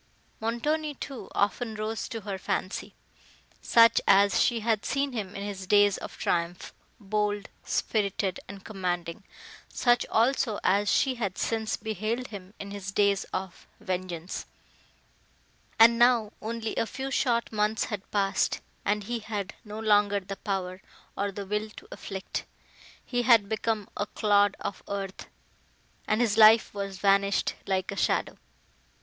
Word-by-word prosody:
Montoni, 295 +7 -1
too, 270 -1 -7
often 220 +3 0
rose 215 +1 -3
to 230 -3 -5
her 195 -1 -5
fancy, 185 - -3 0.7
such 230 0 +6
as 200 +1 +5
she 235 -2 +2
had 220 -1 +1
seen 275 0 0
him 205 -5 -4
in 200 - -4
his 195 -2 -6
days 205 -1 +5
of - - -8
triumph, 170 +1 -2 0.3
bold, 205 0 -1 0.2
spirited 200 -3 -1
and 195 0 -10
commanding; 180 -2 -3 0.5
such 240 -1 +3
also 230 -2 +2
as 200 +2 +3
she 265 - +3
had 195 -3 -2
since 220 -1 -1
beheld 220 +4 -3
him 195 -1 -10
in 200 0 -7
his 200 -1 -5
days 200 0 +2
of 185 -1 -6
vengeance; 185 -3 -4 1.3
and 230 0 +7
now, 240 -3 +4
only 225 0 -3
a 230 - +1
few 265 +3 -5
short 235 -4 +1
months 215 0 +1
had 205 -3 -5
passed—and 205 +1 -1
he 235 +3 -3
had 210 -3 -4
no 210 0 -8
longer 205 -2 +3
the 195 +1 -7
power, 190 -2 -3 0.3
or 200 0 -1
the 200 +1 -6
will 210 +2 -2
to - - -13
afflict;—he 200 +5 -6
had 230 -4 +5
become 220 -1 -1
a 205 - -2
clod 205 -1 +3
of 200 - -4
earth, 195 -1 -5 0.8
and 215 +2 +2
his 225 -2 +2
life 220 +1 +7
was 195 -1 -4
vanished 200 +1 +2
like 190 -1 0
a - - -5
shadow! - - 0
205 Hz, 145 wpm, -28 LUFS, 195-225 Hz, 1.3 s, and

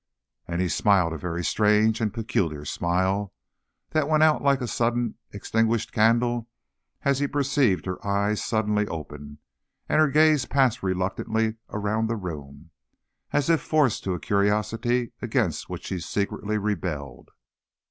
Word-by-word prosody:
And 85 +1 -2
he 90 - +1
smiled 90 -3 +2
a - - -4
very 85 0 -3
strange 110 +1 +3
and 110 -2 0
peculiar 95 - -2
smile, 95 +5 -1 0.6
that 155 -2 +1
went 155 0 +4
out 155 -1 +4
like 140 -1 +3
a 125 - -3
suddenly 120 0 0 0.2
extinguished 115 +2 0
candle, 115 +1 +2 0.5
as 140 -1 +2
he 145 - +1
perceived 140 -8 +1
her 95 -1 -5
eyes 100 +1 0
suddenly 105 -2 0
open, 75 -3 -8 0.5
and 155 - +2
her 155 - +4
gaze 150 -3 +4
pass 130 -4 +2
reluctantly 100 +4 -1
around 105 +2 -1
the 115 - -1
room, 80 -5 -8 0.6
as 145 - +1
if 165 -1 +3
forced 150 -7 +1
to 95 -2 0
a - - -5
curiosity 110 +4 0
against - - -1
which - - -6
she 95 - -3
secretly 100 +4 -2
rebelled. 85 -10 -4
105 Hz, 145 wpm, -25 LUFS, 95-120 Hz, 0.6 s, went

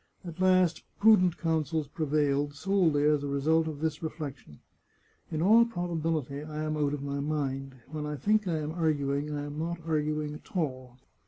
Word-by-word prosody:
At 170 0 -8
last 185 -3 +3 0.2
prudent 185 -5 +5
counsels 160 -2 0
prevailed, 145 -1 0
solely 170 -3 +2
as 150 -1 +3
a 145 - -3
result 155 +4 +2
of 150 -2 -5
this 160 -1 -1
reflec 155 -4 -5
tion: 75 -11 -17 0.4
" - - -36
In 155 +1 -1
all 225 +5 +7
probability 165 - -2
I 155 0 -5
am 155 0 -1
out 145 -1 0
of 140 - -7
my 140 0 -3
mind. 135 -2 -2
When 150 +1 -5
I 150 - -3
think 210 +6 +1
I 165 -3 0
am 150 0 -3
arguing 150 -3 0
I 145 -1 -3
am 145 +1 -6
not 170 +1 -3
arguing 150 -1 -1
at 155 +5 -8
all. 130 -6 -3
155 Hz, 185 wpm, -29 LUFS, 145-165 Hz, 0.4 s, all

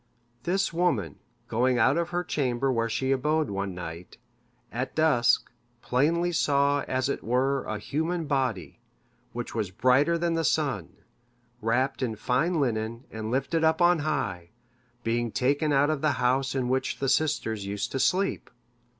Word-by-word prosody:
This 190 +1 0
woman, 140 - 0 0.3
going 125 +2 +1
out 130 +4 +4
of 170 0 -1
the 175 0 -1
chamber 135 -4 0
where 115 -1 0
she 130 +4 -1
abode 150 0 +1
one 100 -1 -3
night, 90 0 -8 0.5
at 125 +3 -4
dusk, 150 -7 +3 0.3
plainly 165 +7 +1
saw 140 -3 +2
as 130 +1 0
it 140 - -3
were 130 +3 +1
a 110 - -3
human 160 - -2
body, 125 - -2 0.5
which 120 0 -5
was 110 -4 -2
brighter 130 - +3
than 170 0 0
the 165 0 0
sun, 140 - 0 0.7
wrapped 130 +6 0
in 115 -4 -1
fine 145 - 0
linen, 115 -2 -1
and 110 0 -5
lifted 135 +6 0
up 160 0 +3
on 175 -1 +4
high, 100 - -2 0.5
being 115 0 0
taken 140 +5 +1
out 145 +2 +3
of 150 -3 -2
the 155 -2 +2
house 130 +2 +1
in 130 -2 0
which 130 +1 -1
the 135 - -2
sisters 125 -8 0
used 100 +1 -3
to 135 - -2
sleep. 190 +7 +1
130 Hz, 160 wpm, -27 LUFS, 115-155 Hz, 0.7 s, out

